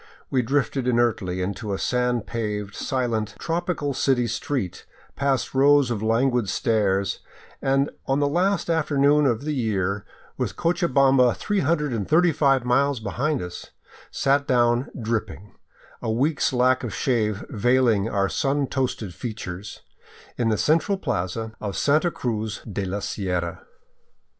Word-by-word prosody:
We 130 - +3
drifted 135 +1 0
inertly 110 -7 +1
into 100 +2 -3
a - - -4
sand 125 +1 0
paved, 105 -3 -3
silent, 115 -5 -2
tropical 165 -4 -2
city 130 -1 +2
street, 120 -5 -3 0.3
past 140 -2 0
rows 140 -1 +4
of 110 -3 -2
languid 115 0 +1
stares, 100 -4 +1 0.4
and 135 +1 +1 0.2
on 135 +1 +1
the 145 - +2
last 185 +7 +1
after 160 -3 0
noon 145 +1 +4
of 120 0 0
the 155 - -1
year, 100 -6 -1 0.4
with - - -2
Cochabamba 135 -7 +3
335 150 - +1
miles 135 +2 +2
behind 125 +6 -1
us, 90 0 -8 0.4
sat 140 +1 +1
down 120 0 +2
dripping, 110 - -3 0.5
a - - -3
week's 140 +7 +1
lack 130 0 +2
of 110 -5 -4
shave 105 -4 0
veiling 115 -2 +2
our 100 -2 +1
sun 140 - 0
toasted 125 -8 -2
features, 100 -2 -7 0.5
in 115 -2 0
the 110 - +1
central 165 - +2
plaza 110 - -3
of 100 -3 -4
Santa 155 +4 +3
Cruz 110 -7 -3
de 100 -2 -4
la 100 +2 -3
Sierra. 90 -4 -3
125 Hz, 135 wpm, -24 LUFS, 105-140 Hz, 0.5 s, rows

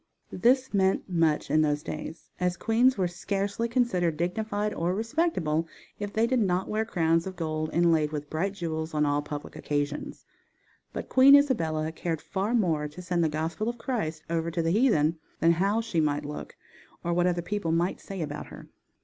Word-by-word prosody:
This 255 +1 +2
meant 190 -1 +2
much 165 -4 +1
in 155 - +4
those 150 -1 +1
days, 160 +2 -7
as 180 0 0
queens 240 +3 +3
were 185 -2 +1
scarcely 200 +5 -2
considered 185 -10 +1
dignified 205 +4 -1
or 175 +2 -1
respectable 215 - 0 0.3
if 205 -1 -4
they 220 +2 +2
did 255 +1 +1
not 190 -3 +1
wear 220 +1 -1
crowns 165 -4 +1
of 190 - -6
gold 155 -2 -2
inlaid 165 -3 +3
with 150 -1 -4
bright 175 +7 -1
jewels 160 -3 -4
on 150 0 +3
all 145 0 +1
public 145 0 -7
occasions, 145 0 -3 0.7
but - - -5
Queen 270 +2 +8
Isabella 160 - +2
cared 165 -1 -3
far 200 +8 -2
more 165 -9 +1
to 150 +4 -12
send 175 -1 0
the 160 - +2
gospel 160 +8 -2
of 240 - -5
Christ 165 -11 -3
over 165 0 -1
to 170 0 -1
the 165 - +1
heathen 170 - +3 0.2
than 165 - +5
how 200 +6 +2
she 220 -8 0
might 145 -1 0
look, 150 +1 -7 0.5
or 170 - 0
what 175 +1 +2
other 175 -1 0
people 190 -2 -2
might 170 +3 0
say 195 -4 -5
about 150 0 -6
her. - - -12
175 Hz, 185 wpm, -27 LUFS, 155-210 Hz, 0.7 s, Queen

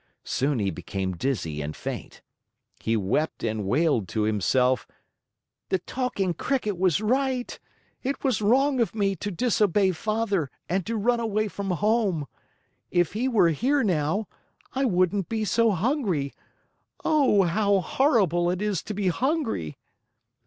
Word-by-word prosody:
Soon 140 +1 0
he 100 -3 0
became 95 +2 -4
dizzy 85 - -2
and 75 +1 -5
faint. - - -7 0.6
He 115 0 0
wept 110 +11 -1
and 110 -2 -1
wailed 130 - +2
to 105 +5 -1
himself: 120 +5 +2 0.8
"The 190 - +2
Talking 195 -3 -2
Cricket 215 - -1
was 185 -1 +2
right. 255 +2 0 0.4
It 275 +1 -3
was 255 -6 +1
wrong 260 +6 +3
of 230 -2 0
me 200 -2 +1
to 205 - -4
disobey 205 -1 +2
Father 200 -3 -1 0.2
and 185 0 -1
to 230 - -1
run 235 +3 +2
away 215 -2 0
from 200 -1 -5
home. 195 -3 +1 0.6
If 175 -2 +1
he 235 +5 0
were 220 -9 +4
here 265 - +1
now, 180 +2 0 0.5
I 270 +1 +1
wouldn't 185 -2 +1
be 220 -1 -1
so 230 +3 +3
hungry! 195 - 0 0.7
Oh, 275 -11 +4
how 200 +3 +2
horrible 180 - +2
it 180 0 -1
is 205 -4 -1
to 210 - -4
be 195 -2 +1
hungry!" 245 - -1
195 Hz, 145 wpm, -26 LUFS, 155-230 Hz, 0.8 s, were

